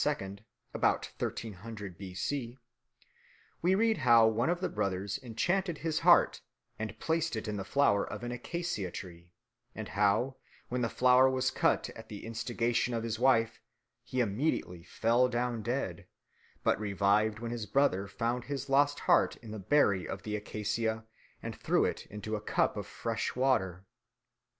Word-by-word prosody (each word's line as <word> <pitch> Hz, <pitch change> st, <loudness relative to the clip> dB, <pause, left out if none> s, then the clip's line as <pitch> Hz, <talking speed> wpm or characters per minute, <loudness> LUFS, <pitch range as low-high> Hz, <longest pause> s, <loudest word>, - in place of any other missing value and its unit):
about -, -, +1 dB
1300 105 Hz, -2 st, -5 dB
B.C., 115 Hz, +8 st, -4 dB, 1.0 s
we 180 Hz, +3 st, +3 dB
read 225 Hz, -2 st, +2 dB
how 120 Hz, -4 st, +6 dB
one 110 Hz, +7 st, +1 dB
of 175 Hz, 0 st, +1 dB
the 185 Hz, -, 0 dB
brothers 95 Hz, +1 st, -2 dB
enchanted 175 Hz, -, -1 dB
his 160 Hz, 0 st, -1 dB
heart -, -, +5 dB, 0.4 s
and 110 Hz, -1 st, -4 dB
placed 165 Hz, 0 st, 0 dB
it 110 Hz, 0 st, -4 dB
in 105 Hz, -, -2 dB
the 100 Hz, -, -3 dB
flower 105 Hz, -2 st, +2 dB
of -, -, -6 dB
an 120 Hz, -, -3 dB
acacia 125 Hz, -, -3 dB
tree, 85 Hz, -1 st, -9 dB, 0.4 s
and 110 Hz, -1 st, -6 dB
how, 105 Hz, +6 st, +2 dB, 0.3 s
when 125 Hz, 0 st, -1 dB
the 115 Hz, -, +1 dB
flower 130 Hz, +1 st, +5 dB
was 130 Hz, 0 st, 0 dB
cut -, -, +1 dB
at 110 Hz, 0 st, -12 dB
the 105 Hz, 0 st, -8 dB
instigation 120 Hz, +1 st, -1 dB
of 115 Hz, -, -2 dB
his 115 Hz, -1 st, -3 dB
wife, 115 Hz, -3 st, +3 dB, 0.4 s
he 130 Hz, -, -1 dB
immediately 100 Hz, -, -1 dB
fell 115 Hz, +8 st, +2 dB
down 120 Hz, -1 st, -1 dB
dead, 100 Hz, -8 st, -3 dB, 0.6 s
but -, -, +2 dB
revived 105 Hz, +1 st, +2 dB
when 115 Hz, +1 st, -5 dB
his 115 Hz, -3 st, -4 dB
brother 100 Hz, -8 st, +2 dB
found 115 Hz, +5 st, -2 dB
the 140 Hz, 0 st, -4 dB
lost 145 Hz, +1 st, +3 dB
heart -, -, +3 dB
in 115 Hz, -3 st, -11 dB
the 110 Hz, -, -5 dB
berry 100 Hz, -4 st, +2 dB
of 95 Hz, -, -6 dB
the 105 Hz, -1 st, -3 dB
acacia 110 Hz, +1 st, -2 dB, 0.4 s
and -, -, -5 dB
threw -, -, +2 dB
it -, -, -3 dB
into 105 Hz, +1 st, -5 dB
a 105 Hz, -, -4 dB
cup -, -, +1 dB
of -, -, -5 dB
fresh -, -, -3 dB
water. 95 Hz, -9 st, +1 dB
115 Hz, 160 wpm, -31 LUFS, 105-130 Hz, 1.0 s, how